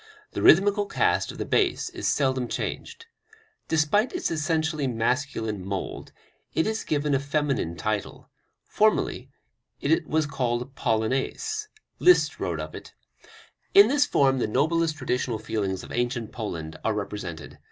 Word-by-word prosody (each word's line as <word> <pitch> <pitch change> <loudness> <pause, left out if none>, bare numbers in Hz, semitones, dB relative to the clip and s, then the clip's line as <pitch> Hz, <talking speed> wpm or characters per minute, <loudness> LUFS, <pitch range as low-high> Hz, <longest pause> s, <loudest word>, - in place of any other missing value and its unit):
The - - -4
rhythmical 200 +3 +5
cast - - +1
of - - -11
the - - -3
bass 370 -3 +1
is 360 -1 -3
seldom 130 -3 +1
changed. 460 - -5 0.6
Despite 160 +9 +2
its 360 - -2
essentially 155 -2 0
masculine 115 -4 -1
mould, 95 0 -5 0.4
it 160 - +2
is 220 0 -2
given 145 -1 0
a 135 - +3
feminine 140 - -1
title; 105 +5 -3 0.4
formerly - - +1 0.5
it 155 +2 +1
was 155 0 +1
called 125 -2 -2
Polonais. 135 - -1 0.3
Liszt 360 0 +4
wrote - - -2
of - - -6
it: - - -10 0.8
"In 400 +1 +9
this 290 +1 +3
form 135 -2 +3
the 120 - 0
noblest 155 +6 +1
traditional 125 -3 -1
feelings 100 -3 -3
of - - -10
ancient 120 -2 -2
Poland 85 -9 -6
are 110 - 0
represented. 95 -7 -6
135 Hz, 140 wpm, -26 LUFS, 110-160 Hz, 0.8 s, In